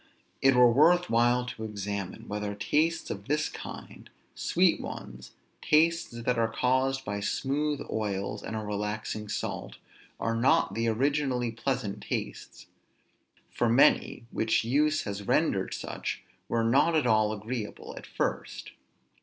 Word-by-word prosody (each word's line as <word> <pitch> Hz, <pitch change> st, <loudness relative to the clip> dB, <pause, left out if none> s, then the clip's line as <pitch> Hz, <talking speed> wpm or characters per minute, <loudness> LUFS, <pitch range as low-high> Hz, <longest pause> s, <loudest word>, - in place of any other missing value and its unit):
It 135 Hz, -1 st, +5 dB
were 125 Hz, -1 st, +7 dB
worth 170 Hz, +6 st, +4 dB
while 120 Hz, +2 st, +3 dB
to 115 Hz, -2 st, -7 dB
examine, 100 Hz, -3 st, -5 dB
whether 105 Hz, 0 st, -3 dB
tastes 155 Hz, +11 st, 0 dB
of 100 Hz, 0 st, -7 dB
this 150 Hz, +2 st, +1 dB
kind, -, -, -9 dB, 0.2 s
sweet -, -, +2 dB
ones, 60 Hz, +1 st, -8 dB, 0.3 s
tastes 165 Hz, +2 st, +3 dB
that 125 Hz, 0 st, +1 dB
are 115 Hz, 0 st, +1 dB
caused 130 Hz, +3 st, +1 dB
by 100 Hz, 0 st, -3 dB
smooth 145 Hz, +7 st, -1 dB
oils 100 Hz, -2 st, -3 dB
and 110 Hz, -, -5 dB
a 110 Hz, -, -2 dB
relaxing 105 Hz, +1 st, -3 dB
salt, -, -, -4 dB, 0.4 s
are 115 Hz, -, 0 dB
not 115 Hz, -4 st, +3 dB
the 115 Hz, +2 st, -1 dB
originally 125 Hz, 0 st, +1 dB
pleasant 115 Hz, -3 st, -3 dB
tastes. -, -, -5 dB, 0.9 s
For 120 Hz, -, +1 dB
many, 120 Hz, 0 st, +3 dB
which 110 Hz, 0 st, +1 dB
use 150 Hz, +6 st, +2 dB
has 100 Hz, -1 st, -5 dB
rendered -, -, +1 dB
such, -, -, -5 dB, 0.3 s
were 115 Hz, -1 st, +1 dB
not 135 Hz, +8 st, +3 dB
at 155 Hz, -, +2 dB
all 110 Hz, -2 st, +3 dB
agreeable 110 Hz, +1 st, -5 dB
at -, -, -10 dB
first. -, -, -3 dB
115 Hz, 135 wpm, -28 LUFS, 105-135 Hz, 0.9 s, were